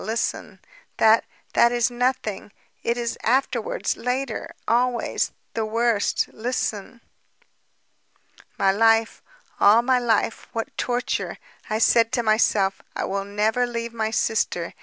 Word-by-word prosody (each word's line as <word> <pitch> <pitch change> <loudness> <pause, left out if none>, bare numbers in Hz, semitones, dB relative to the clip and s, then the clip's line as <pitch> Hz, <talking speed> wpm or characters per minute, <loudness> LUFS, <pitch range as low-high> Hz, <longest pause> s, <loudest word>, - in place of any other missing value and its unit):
listen... 225 +3 -3 0.4
that, 220 +1 +5 0.3
that 235 - +5
is 240 0 +1
nothing. 240 -5 -2 0.3
It 235 +1 -1
is 235 -1 -3
afterwards, 275 - 0
later... 250 -1 -3 0.2
always... 245 +1 +1 0.2
the 225 - -1
worst... 225 -1 +1
listen. 230 -1 -3 1.6
"My 195 - +3
life, 225 +2 +2 0.4
all 220 +4 +6
my 255 0 +3
life... 225 -2 0
what 225 -1 -4
torture! 245 0 -2 0.3
I 215 - 0
said 230 0 +4
to 240 -2 +1
myself: 215 -3 +2
'I - - -2
will 195 0 -3
never 215 +4 0
leave 235 -1 -4
my 220 -1 -1
sister. 215 -6 -1
230 Hz, 120 wpm, -23 LUFS, 215-240 Hz, 1.6 s, all